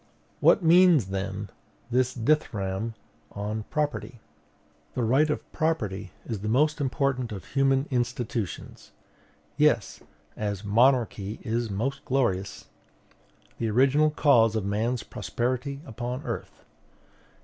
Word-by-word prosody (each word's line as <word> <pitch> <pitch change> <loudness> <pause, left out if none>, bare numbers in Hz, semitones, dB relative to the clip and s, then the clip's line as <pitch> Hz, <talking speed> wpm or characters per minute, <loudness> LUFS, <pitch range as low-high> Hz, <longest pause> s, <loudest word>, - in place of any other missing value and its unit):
What 195 - +5
means, 170 - +6
then, 95 +1 -4 0.4
this 125 +1 +1
dithyramb 110 -6 0 0.3
upon 105 +1 -4
property? 145 -5 -2 0.8
"The 125 - 0
right 135 +7 +3
of 150 - -1
property 110 - -1 0.2
is 110 -4 -4
the 105 +2 -3
most 150 +6 +2
important 135 -3 0
of 100 -4 -7
human 135 0 +2
institutions."... 120 - -3 0.6
Yes; 150 -8 +2 0.4
as 100 -1 -3
monarchy 115 -2 +2
is 115 +1 -1
the 100 - -5
most 135 +7 -2
glorious. 100 -8 -1 0.9
"The 115 - 0
original 135 +7 +4
cause 120 -7 +4
of 110 -3 -1
man's 110 +4 -1
prosperity 130 +3 -3
upon 125 +3 -5
earth." - - -6
120 Hz, 115 wpm, -27 LUFS, 105-140 Hz, 0.9 s, means